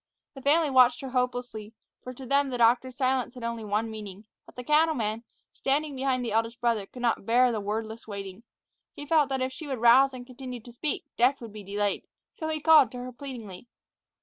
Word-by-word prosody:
The 270 - -10
family 300 +2 +3
watched 250 -2 +5
her 265 -2 -6
hopelessly, 245 -4 -3 0.3
for 255 - -7
to 260 +1 -10
them 280 +2 +2
the 250 - -3
doctor's 245 +2 +3
silence 255 -1 0
had 250 - -9
only 230 -1 -3
one 215 +2 -1
meaning; 210 -1 -9 0.2
but - - -16
the 250 - -7
cattleman, 255 -7 +1 0.3
standing 285 +1 -1
behind 260 -1 0
the 230 - -3
eldest 230 +2 -1
brother, 230 -4 0
could 245 +3 -10
not 235 -4 +1
bear 245 +2 +4
the 220 -3 -2
wordless 220 +2 -4
waiting. 200 -1 -7 0.5
He 290 - -8
felt 300 -2 +3
that 265 -1 -1
if 260 0 -3
she 310 +2 -8
would 265 -2 -3
rouse 255 +4 +5
and 245 -1 -8
continue 255 -1 -8
to 240 - -13
speak, 285 +6 -3
death 255 +4 +3
would 230 -3 -10
be 215 - -8
delayed. 205 +1 -2 0.3
So 315 - -5
he 315 -1 -2
called 305 -6 +6
to - - -6
her 250 +1 -6
pleadingly. 240 -6 -9
245 Hz, 210 wpm, -27 LUFS, 225-270 Hz, 0.5 s, called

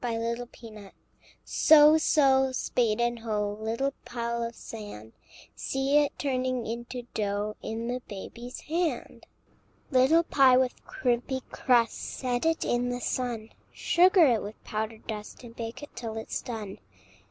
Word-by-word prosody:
BABY'S 230 0 -1
BAKING 220 -4 -10 0.5
So, 310 0 +6
so, 265 -4 +4
spade 235 -3 0
and 240 0 0
hoe, 210 -2 -2
Little 230 +5 -1
pile 235 -1 -3
of 230 0 -4
sand; 205 - -9 0.4
See 270 +2 +1
it 290 -1 0
turning 255 -3 -1
into 240 +2 -5
dough 205 0 -2
In 225 +1 -4
the 250 +1 -2
baby's 235 +5 -8
hand! 330 +1 -3 0.6
Little 270 +6 +5
pie 265 -5 +5
with 255 -1 0
crimpy 250 +1 -1
crust, 240 -3 +2
Set 250 +3 -2
it 325 0 +1
in 245 +1 0
the 245 0 -2
sun; 240 -3 -3 0.2
Sugar 360 0 +5
it 235 -6 +3
with 210 +2 -9
powdered 220 +1 -4
dust, 215 +2 -7
And 230 -1 -11
bake 230 +4 -6
it 290 - -11
till 225 -2 -5
it's 220 - -4
done. 215 -5 -6
240 Hz, 140 wpm, -28 LUFS, 225-265 Hz, 0.6 s, So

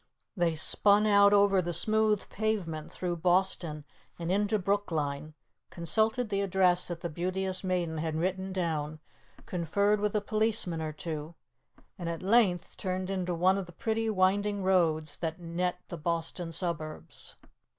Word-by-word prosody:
They 170 -4 +1
spun 205 +6 +4
out 200 -1 +6
over 200 -2 +5
the 175 -1 -2
smooth 215 0 +2
pavement 190 -8 -2
through 175 -2 -3
Boston 175 -3 +1 0.3
and 170 0 -3
into 205 +2 +2
Brookline, 155 -7 -2 0.3
consulted 220 +7 +1
the 200 -1 0
address 185 -2 +2
that 170 -1 -5
the - - -2
Beauteous 185 +4 -2
Maiden 175 -4 -1
had 160 0 -2
written 190 +3 -1
down, 155 -4 -2 0.5
conferred 200 +4 +1
with 210 0 -1
a - - +4
policeman 215 -6 0
or 155 -1 -3
two, 155 +1 -6 0.6
and 170 -2 -3
at 165 +1 -5
length 195 -4 +2
turned 185 0 -3
into 180 -2 -1
one 185 +3 +3
of 190 - -5
the - - -11
pretty 225 +4 -1
winding 200 0 +1
roads 165 -5 +2
that 165 -1 -3
net 175 +1 -2
the 170 - -5
Boston 165 +1 -2
suburbs. 165 -2 -4
180 Hz, 150 wpm, -30 LUFS, 165-200 Hz, 0.6 s, out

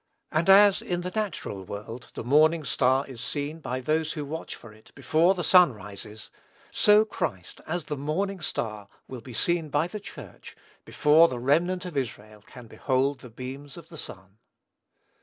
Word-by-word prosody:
And 160 +4 +1
as, 200 0 +7
in 175 -1 -2
the 180 +1 -5
natural 185 - -4
world, 105 +6 -8
the - - -5
morning 155 +6 +4
star 135 0 +2
is 125 -4 -10
seen, 145 +4 -4
by 130 -4 -4
those 155 +3 0
who 150 -3 -5
watch 160 +3 -6
for 110 -2 -14
it, 110 0 -20
before 160 +7 +2
the 175 - -3
sun 180 -3 +6
rises, 105 +1 -9 0.4
so 210 +1 +5
Christ, 115 - -5
as 170 0 -3
the 150 - -3
morning 180 +8 -2
star, 105 -8 -3 0.2
will 130 -2 -8
be 125 - -11
seen 165 +6 0
by 145 +3 +1
the 210 +4 -7
Church, 205 - -11 0.3
before 155 +2 +5
the 130 - -5
remnant 170 +9 +1
of 175 -4 -7
Israel 110 -5 -5
can 125 +3 -13
behold 130 +4 -1
the 125 - -12
beams 130 +6 -8
of 170 -1 -12
the 170 - -12
Sun. 95 -4 -8
145 Hz, 175 wpm, -26 LUFS, 120-170 Hz, 0.4 s, as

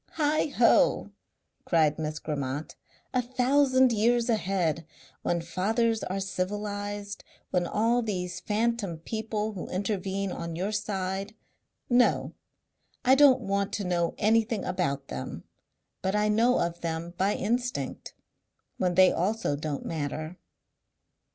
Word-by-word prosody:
"Heighho!" 295 -5 +3 0.5
cried 155 -3 +2
Miss 155 0 -3
Grammont. 145 -1 -4 0.4
"A 255 - +3
thousand 260 +1 +3
years 235 +2 +2
ahead! 180 -7 0 0.4
When 170 -1 0
fathers 220 +7 0
are 190 +1 -2
civilized. 205 +1 -4 0.3
When 175 -1 +1
all 230 +5 +2
these 185 -5 -3
phanton 215 -4 -1
people 220 +4 -3
who 195 -4 -6
intervene 195 0 -2
on 170 -1 -5
your 190 +5 -2
side 195 -1 -3 0.5
no! 245 0 +3 0.7
I 255 - +6
don't 270 -2 +6
want 200 -1 -1
to 205 - -2
know 175 -2 0
anything 225 +1 +2
about 140 -7 -2
them, 65 - -6 0.6
but 190 +2 0
I 210 0 +2
know 230 +4 +4
of 170 0 -2
them 170 +1 -3
by 195 +2 +2
instinct 245 +2 -2 0.6
when 180 -1 0
they 185 0 +7
also 205 -3 0
don't 145 -1 -4
matter." 155 +1 -4
200 Hz, 120 wpm, -28 LUFS, 175-225 Hz, 0.7 s, they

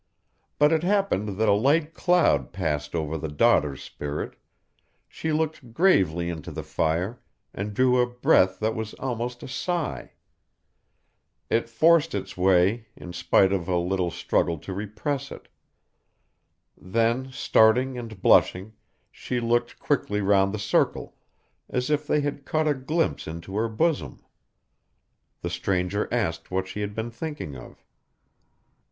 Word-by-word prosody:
But 150 +1 +5
it 160 - +2
happened 175 - 0
that 110 +1 +2
a - - +5
light 150 +9 +2
cloud 170 - +2
passed 75 -5 -2
over 80 -1 -2
the 80 - -3
daughter's 75 -1 +2
spirit; 75 0 -5 0.7
she 160 - -4
looked 155 -6 -2
gravely 90 - +3
into 85 -3 -5
the - - -6
fire, 90 +10 -1 0.3
and 105 +2 -4
drew 125 +1 +3
a 125 - +2
breath 120 -6 +3
that 110 +1 +1
was 110 -1 -5
almost 120 -1 -4
a - - -7
sigh. 170 +5 -3 1.4
It 115 0 +1
forced 165 +6 +4
its - - -5
way, 95 +5 +3
in 90 - -9
spite 95 +2 +3
of 90 -4 -2
a 90 -1 +1
little 90 +1 0
struggle 85 0 0
to 85 +5 -7
repress 105 +8 -4
it. - - -11 1.3
Then 115 +6 0
starting 125 +1 +3
and 115 -5 -8
blushing, 95 +4 +4 0.4
she 125 - -3
looked 120 +1 0
quickly 110 -7 0
round 100 -1 +3
the 110 - -3
circle, 105 +1 0 0.5
as 125 +3 -1
if 150 0 0
they 150 - +2
had 145 -1 -3
caught 155 +2 0
a 150 - +3
glimpse 150 +5 -1
into 85 +4 -7
her 115 +2 0
bosom. 155 +8 -1 1.2
The - - -2
stranger 95 +2 -1
asked 85 -9 -1
what 95 0 -2
she 95 +2 -5
had 105 0 -4
been 115 +1 -3
thinking 145 - -6
of. - - -13
110 Hz, 145 wpm, -25 LUFS, 90-135 Hz, 1.4 s, But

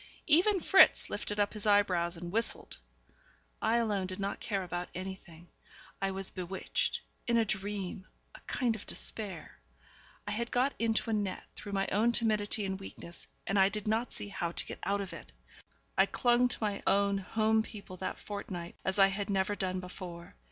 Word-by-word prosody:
Even 365 +6 +5
Fritz 385 +3 +6
lifted 205 0 -3
up 205 0 +2
his 215 -1 -4
eyebrows 180 -4 +3
and 175 0 -6
whistled. 225 +3 0 0.8
I 225 - +3
alone 205 -5 +1
did 185 +1 -5
not 200 0 -2
care 195 -3 -2
about 175 0 -4
anything. 185 -2 -8 0.5
I 195 - +1
was 195 0 -1
bewitched, 185 +1 -2 0.3
in 235 -1 +3
a 225 - +4
dream, 195 -2 -3 0.3
a - - -12
kind 240 -3 +1
of 215 - -9
despair. 210 -4 -2 0.7
I - - -1
had 235 +3 -2
got 255 +3 +2
into 225 0 +1
a - - +1
net 205 -3 -1
through 205 - -7
my 195 0 +1
own 225 +4 +3
timidity 215 -2 +2
and 190 0 -3
weakness, 170 -3 -9 0.2
and 195 0 +1
I 190 0 +6
did 210 0 -5
not 225 +3 +1
see 205 - -5
how 170 -4 -2
to - - -1
get - - -7
out 200 0 +1
of 195 - -6
it. - - -10 0.6
I - - +5
clung 245 0 +3
to - - -2
my 205 -2 -1
own 200 0 +3
home 220 +3 +2
people 205 -4 -9
that 185 - -3
fortnight 185 -4 -6
as 190 +1 -1
I 195 - +8
had 200 +1 -3
never 195 0 +1
done 185 -2 -2
before. 180 -1 -8
200 Hz, 185 wpm, -32 LUFS, 190-220 Hz, 0.8 s, I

